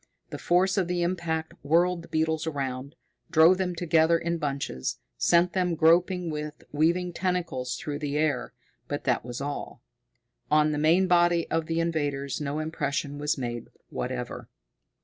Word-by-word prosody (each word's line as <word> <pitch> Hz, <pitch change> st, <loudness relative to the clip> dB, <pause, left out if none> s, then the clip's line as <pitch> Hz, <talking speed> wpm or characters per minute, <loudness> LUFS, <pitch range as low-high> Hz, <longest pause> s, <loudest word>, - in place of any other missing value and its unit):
The -, -, -5 dB
force 185 Hz, +3 st, +2 dB
of 185 Hz, -, 0 dB
the 175 Hz, -1 st, 0 dB
impact 170 Hz, -2 st, -2 dB
whirled 170 Hz, +4 st, +2 dB
the 170 Hz, -, -13 dB
beetles 160 Hz, 0 st, 0 dB
around, 135 Hz, -2 st, -4 dB, 0.3 s
drove 165 Hz, +4 st, +6 dB
them 180 Hz, -2 st, -1 dB
together 165 Hz, -1 st, +3 dB
in 170 Hz, 0 st, -2 dB
bunches, 140 Hz, -, -3 dB, 0.2 s
sent 170 Hz, -, +3 dB
them 180 Hz, -2 st, +1 dB
groping 170 Hz, +2 st, +3 dB
with 150 Hz, 0 st, -6 dB
weaving 170 Hz, +4 st, +1 dB
tentacles 170 Hz, -9 st, -2 dB
through 145 Hz, -1 st, -4 dB
the 145 Hz, -1 st, -2 dB
air 140 Hz, -6 st, 0 dB, 0.4 s
but 145 Hz, -, -4 dB
that 125 Hz, -4 st, +1 dB
was 125 Hz, +2 st, -6 dB
all. 145 Hz, +1 st, -5 dB, 0.7 s
On 150 Hz, 0 st, +4 dB
the 150 Hz, -, -1 dB
main 165 Hz, +5 st, +4 dB
body 175 Hz, -1 st, +3 dB
of 165 Hz, -1 st, 0 dB
the 165 Hz, 0 st, -1 dB
invaders 145 Hz, -5 st, -1 dB
no 145 Hz, 0 st, -2 dB
impression 145 Hz, -2 st, -2 dB
was 150 Hz, 0 st, 0 dB
made 120 Hz, -3 st, -4 dB, 0.2 s
whatever. -, -, -5 dB
160 Hz, 155 wpm, -27 LUFS, 145-175 Hz, 0.7 s, drove